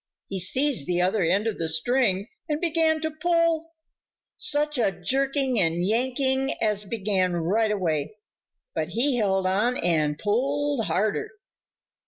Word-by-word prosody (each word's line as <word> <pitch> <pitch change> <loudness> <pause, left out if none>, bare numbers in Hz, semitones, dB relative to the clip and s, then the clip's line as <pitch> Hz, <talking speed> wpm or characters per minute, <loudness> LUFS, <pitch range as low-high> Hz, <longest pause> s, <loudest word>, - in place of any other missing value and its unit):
He 195 - -3
seized 255 - +1
the 175 0 0
other 185 +4 +1
end 190 +5 +1
of 225 -2 -2
the 165 - -1
string 200 +3 +1 0.2
and 300 0 0
began 320 -2 +1
to 315 0 -2
pull. 330 0 0 0.6
Such 295 -1 0
a 225 - +3
jerking 270 +3 0
and 170 0 +1
yanking 260 +4 +1
as 210 -2 0
began 195 -4 0
right 200 +7 +1
away! 170 -3 -1 0.6
But - - -2
he 255 +2 +2
held 195 -4 +1
on 210 +7 +1
and 155 -3 0
pulled 275 - 0
harder. 205 - -1
225 Hz, 140 wpm, -25 LUFS, 185-280 Hz, 0.6 s, a